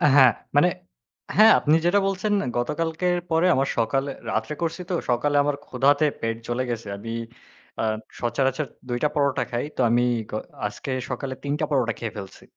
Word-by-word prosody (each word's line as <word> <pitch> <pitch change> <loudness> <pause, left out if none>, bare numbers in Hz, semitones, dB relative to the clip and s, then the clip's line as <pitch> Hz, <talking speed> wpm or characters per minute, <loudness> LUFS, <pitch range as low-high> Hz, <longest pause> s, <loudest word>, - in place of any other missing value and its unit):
হ্যাঁ, 130 -4 +8 0.2
মানে, 145 +5 +6 0.7
হ্যাঁ, 220 +1 +9
আপনি 150 +1 +3
যেটা 185 +4 +4
বলছেন 195 +2 0 0.2
গতকালকের 160 +7 0
পরে 165 +1 +3
আবার 135 +1 +1
সকালে, 135 +5 +1 0.2
রাত্রে 110 +6 -1
করছি 165 +2 -2
তো, - - -1 0.2
সকালে 145 +5 +1
আমার 145 0 0
ক্ষুধাতে 145 +4 +3 0.2
পেট 115 0 -1
জ্বলে 120 +2 -1
গেছে। 115 -2 -5
আমি 115 +3 -7 0.7
আ - - 0 0.4
সচারাচর 135 +4 0 0.2
দুইটা 120 +5 +1
পরোটা 140 -2 +2
খাই। 120 0 -1
তো - - +1
আমি 120 +1 +3 0.3
গ - - -11 0.3
আজকে 120 +6 -6 0.2
সকালে 130 +1 -3
তিনটা 145 +1 -1
পরোটা 125 -5 +2
খেয়ে 115 -3 -4
ফেলছি। 95 -1 -9
135 Hz, 160 wpm, -24 LUFS, 120-155 Hz, 0.7 s, হ্যাঁ